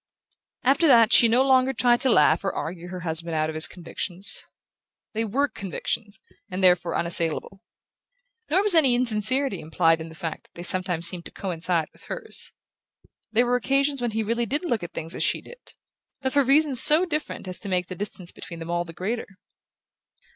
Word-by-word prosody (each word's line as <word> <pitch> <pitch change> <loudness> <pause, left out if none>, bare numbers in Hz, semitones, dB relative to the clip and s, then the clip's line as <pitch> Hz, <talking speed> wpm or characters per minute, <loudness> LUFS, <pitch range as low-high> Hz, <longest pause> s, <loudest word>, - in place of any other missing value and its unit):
After 280 +6 +3
that 230 -4 +5
she 235 - +7
no 240 +3 +3
longer 265 0 +3
tried 240 -2 +2
to 265 - +3
laugh 230 - +3
or 195 - -1
argue 175 +1 -6
her 180 0 -7
husband 165 0 +1
out 155 0 0
of - - -10
his 155 +1 +3
convictions. 180 +2 -1 0.7
They 225 +1 -1
WERE 260 +7 0
convictions, 205 +1 -5 0.3
and 185 0 -4
therefore 180 -1 +3
unassailable. 170 +3 +1 0.9
Nor 370 +6 +2
was 415 -2 +2
any 280 -7 +4
insincerity 245 -1 0
implied 165 +1 +1
in 160 - -8
the 160 - -13
fact 165 0 -6
that - - -29
they 175 - -8
sometimes 180 -2 +4
seemed 170 0 -2
to - - -10
coincide 170 -3 -2
with - - -19
hers. 480 -3 0 0.8
There 235 +3 +3
were 245 +1 +1
occasions 275 +2 0
when 240 - -1
he 220 0 -2
really 230 +2 -2
did 290 - -2
look 235 - -1
at 175 0 -8
things 165 +2 -5
as - - -3
she - - 0
did; - - -15 0.4
but 265 -1 -3
for 285 -1 +3
reasons 275 0 +4
so 315 +4 +5
different 305 - -5
as 185 - -3
to 200 - -7
make 180 -1 0
the 185 - -8
distance 185 -1 -3
between 170 - -10
them 165 +1 -7
all 175 0 -1
the 165 - -11
greater. 215 +8 -4
205 Hz, 195 wpm, -24 LUFS, 175-260 Hz, 0.9 s, she